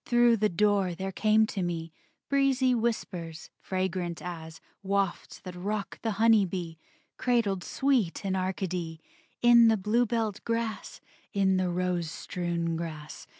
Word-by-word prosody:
Through 240 -1 +4
the 215 0 +2
door 195 -1 +2
there 190 +2 -4
came 215 +2 +3
to 205 -3 -4
me 165 -2 -3 0.3
Breezy 270 -2 +3
whispers, 180 -9 -3
fragrant 185 -2 -2
as 160 -2 -7 0.2
Wafts 195 -2 -1
that 185 - -8
rock 200 +1 -4
the 225 -2 -1
honey 225 -1 +5
bee, 175 -3 -5 0.4
Cradled 220 -7 +1
sweet 250 -10 0
in 190 -1 0
Arcady, 185 -3 -3 0.4
In 235 -1 +8
the 225 -1 +4
bluebelled 220 0 0
grass, 230 -1 -3 0.3
In 190 -2 +3
the 185 -1 +1
rose 175 -2 -1
strewn 170 0 -3
grass. 155 -2 -7
190 Hz, 135 wpm, -28 LUFS, 175-225 Hz, 0.4 s, In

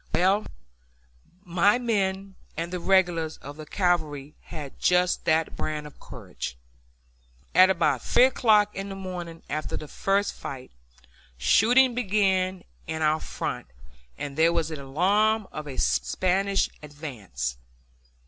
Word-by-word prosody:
Well, 195 +4 +2 1.0
my 185 +5 +3
men 195 -5 -1 0.2
and 170 +2 -3
the 180 - -2
regulars 175 -4 +2
of 145 +1 -10
the 155 -1 -9
cavalry 155 -6 -1
had 150 -5 -8
just 180 0 +2
that 160 0 +1
brand 150 -1 -3
of 150 - -13
courage. 60 - -8 1.0
At 185 +1 +7
about 155 -9 +2
three - - +4
o'clock 215 -5 +4
on 195 +1 -5
the 195 - -6
morning 180 -3 -7
after 155 +1 -3
the 155 - -8
first 200 +6 0
fight, 130 -2 -8 0.7
shooting 240 - +4
began 190 -5 +1 0.2
in 160 0 -2
our 155 +1 +3
front - - -5 0.5
and 145 -1 -5
there 165 +2 +4
was 165 -1 -1
an 155 - -5
alarm 200 +10 +1
of 150 0 -7
a 135 - -7
Spanish 195 +2 +1
advance. 110 - -6
175 Hz, 130 wpm, -26 LUFS, 150-195 Hz, 1.0 s, At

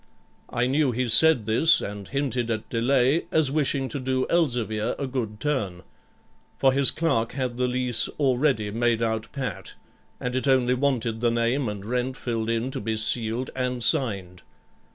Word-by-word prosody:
I 120 - 0
knew 135 +1 +1
he 125 +1 -1
said 125 0 +5
this, 120 +10 +5
and 100 -1 -6
hinted 130 -4 -2
at 110 -1 -3
delay 130 +5 +2
as 155 -4 +3
wishing 140 -2 0
to 145 - -4
do 130 0 -1
Elzevir 120 -10 0
a 140 - -3
good 120 -5 -4
turn; 110 -12 -2 0.7
for 135 -1 +3
his 135 0 +5
clerk 140 -9 0
had 125 -3 -3
the 125 - +2
lease 125 -1 0
already 130 -6 +1
made 115 +1 0
out 110 0 -2
pat, 135 -3 -5 0.4
and 125 0 -3
it 130 +2 -1
only 130 -2 +3
wanted 125 -4 -1
the 120 - +3
name 115 +2 0
and 100 -1 -7
rent 125 +3 -2
filled 115 -2 -3
in 115 +3 -1
to - - -4
be 110 +1 -2
sealed 115 +2 0
and 125 -2 -2
signed. 95 -8 0
125 Hz, 170 wpm, -25 LUFS, 115-135 Hz, 0.7 s, said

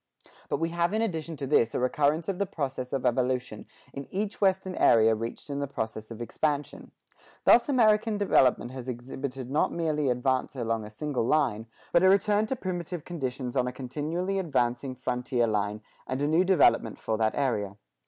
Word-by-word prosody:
But - - 0
we 165 +1 -1
have 170 +3 0
in 220 - +1
addition 165 -6 -3
to 140 - -4
this 125 -5 +2
a - - +1
recurrence 145 +5 +1
of 195 -1 -2
the 200 - 0
process 135 -6 -4
of 135 - -2
evolution 125 -2 -1 0.3
in 140 0 -7
each 205 +2 -3
western 190 -1 +2
area 115 -8 +5
reached 115 +2 -5
in 140 -1 -4
the 140 - -2
process 110 -4 -5
of 115 0 -6
expansion. 145 +4 -2 0.6
Thus 240 +4 +6
American 220 -4 +3
development 130 -11 +3
has 130 -1 -7
exhibited 130 +1 -6
not 150 - +2
merely 155 -4 0
advance 130 +2 0
along 115 -3 -2
a - - -8
single 125 +1 -2
line, 125 -8 +1 0.2
but 170 - +4
a 185 - +6
return 205 +2 +3
to 265 - -1
primitive 175 - -5
conditions 130 -6 -4
on 125 -1 +1
a - - -2
continually 155 +9 -3
advancing 130 -5 -1
frontier 125 -1 -1
line, 105 -1 -1 0.3
and 130 - -2
a 145 - +1
new 160 +4 +3
development 165 -11 +3
for 110 - -2
that 110 -1 +1
area. 105 -8 -1
135 Hz, 185 wpm, -28 LUFS, 125-170 Hz, 0.6 s, Thus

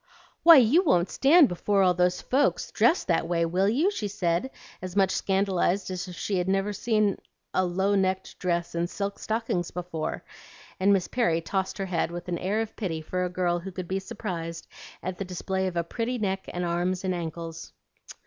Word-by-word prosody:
'Why, 335 0 +9
you 270 +9 +5
won't 180 - +2
stand 295 +2 +6
before 195 +2 +1
all 180 -1 +4
those 180 0 +1
folks 275 +3 +1
dressed 345 - +3
that 165 -2 +1
way, 170 -1 +1
will 185 +4 +1
you?' 305 - +2
she 215 - -3
said, 190 +2 -1 0.3
as 185 0 -6
much 195 -2 +3
scandalized 195 -1 0
as 185 0 -4
if 180 - -8
she'd 180 0 -1
never 195 +2 0
seen 215 -1 +1 0.3
a 185 - +2
low 190 +3 0
necked 190 -1 -1
dress 175 -2 -1
and 170 +1 -1
silk 200 +1 -4
stockings 220 -6 -2
before;" 175 -3 -4 0.6
and 195 +2 +4
Miss 195 -3 +2
Perry 200 -10 +1
tossed 190 +3 -2
her 195 - -2
head 175 -3 -1
with 175 +1 -7
an 170 - -2
air 205 +4 0
of 225 - -5
pity 175 -7 -3
for 180 +3 -2
a 180 - -1
girl 175 -1 0
who 190 +3 -7
could 180 -1 -6
be 190 +2 -1
surprised 180 -6 -5 0.4
at 185 0 -4
the - - -1
display 190 +1 -2
of 175 -2 -4
a 170 - +1
pretty 235 +8 -3
neck 195 -3 -2
and 175 0 -3
arms 175 +2 -1
and 185 -1 0
ankles. 165 -1 -6
185 Hz, 195 wpm, -27 LUFS, 175-200 Hz, 0.6 s, Why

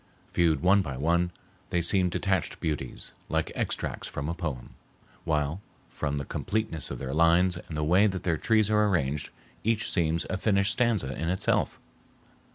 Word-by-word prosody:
Viewed 85 -2 +2
one 100 +2 +5
by 70 -8 -5
one, 85 +5 +2 0.4
they 90 - +1
seem 90 +2 +3
detached 95 0 -1
beauties, 75 -3 -3 0.2
like - - 0
extracts - - -3
from 70 +2 -4
a - - -1
poem, 75 -8 -5 0.5
while, 75 +3 0 0.3
from 75 -1 -2
the 70 - -3
completeness 110 -5 -2
of - - -4
their 65 -1 -4
lines 85 +3 +4
and 80 - -4
the 75 - 0
way 90 +7 +5
that 95 -3 -3
their 85 -3 +1
trees 110 +1 +2
are 105 0 +4
arranged, 75 -7 0 0.3
each 110 0 0
seems 85 -2 +1
a 95 - -2
finished 100 0 +2
stanza 110 - +1
in 80 +2 -2
itself. 95 +1 0
85 Hz, 165 wpm, -28 LUFS, 75-100 Hz, 0.5 s, one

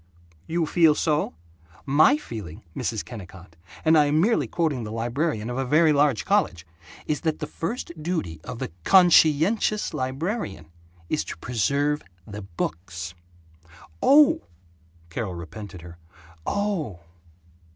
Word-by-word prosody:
"You 165 0 0
feel 160 -1 +4
so? 150 - 0 0.5
My 155 - +5
feeling, 105 - -8
Mrs. 110 -3 -2
Kennicott, 95 -7 -11 0.3
and 160 +1 +6
I 150 -2 +6
am 145 +2 +2
merely 220 +7 +2
quoting 155 -8 -1
the 105 - -6
librarian 120 +1 -1
of 125 +2 -3
a - - +1
very 155 +4 +4
large 140 -5 +2
college, 85 +1 +1 0.4
is 150 - -1
that 160 -2 0
the 155 - -4
first 170 +8 -4
duty 150 - -3
of 125 -1 -7
the - - -5
CONSCIENTIOUS 180 - +4
librarian 130 - -3 0.4
is - - 0
to - - -7
preserve 140 - 0 0.2
the 105 0 -7
books." 85 -2 -5 0.9
"Oh!" 290 +1 +6 0.7
Carol 95 +1 -3
repented 90 +2 -9
her 85 0 -12 0.5
"Oh." 190 - -2
140 Hz, 130 wpm, -25 LUFS, 95-160 Hz, 0.9 s, and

